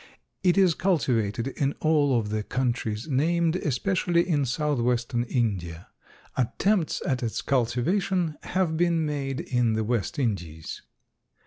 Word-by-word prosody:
It 180 0 +3
is 185 -3 +5
cultivated 125 - 0
in 140 +1 -1
all 145 -5 +3
of 105 -2 -4
the 110 0 -1
countries 120 -1 -2
named, 165 +4 +1
especially 170 +4 +1
in 145 -6 +1
southwestern 120 -3 0
India. 95 - -2 0.5
Attempts 170 - 0
at 130 -3 0
its 115 -3 -2
cultivation 155 - +1
have 180 -3 0
been 170 -1 +2
made 140 -1 -2
in 125 -8 +1
the 110 0 0
West 115 +4 -1
Indies. 85 - -3
135 Hz, 125 wpm, -26 LUFS, 115-165 Hz, 0.5 s, is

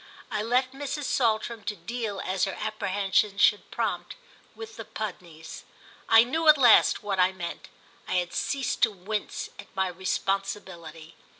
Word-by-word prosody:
I 215 -1 -1
left 250 +4 +1
Mrs. 285 +2 -4
Saltram 230 -3 0
to 215 - -2
deal 225 -3 -4
as 185 0 0
her 195 - -5
apprehensions 200 -1 0
should 210 - +3
prompt - - -3 0.4
with 445 0 -9
the - - -7
Pudneys. 175 -6 -7 0.5
I 225 0 +8
knew 315 +7 -1
at 305 -1 +9
last 245 -5 +5
what 200 -2 -2
I 180 +1 +4
meant—I 180 0 -8
had 180 -1 -1
ceased 270 -3 -2
to 225 - +5
wince 205 +2 -5
at - - -9
my 190 -1 +1
responsibility. 185 -3 -4
205 Hz, 145 wpm, -27 LUFS, 185-235 Hz, 0.5 s, at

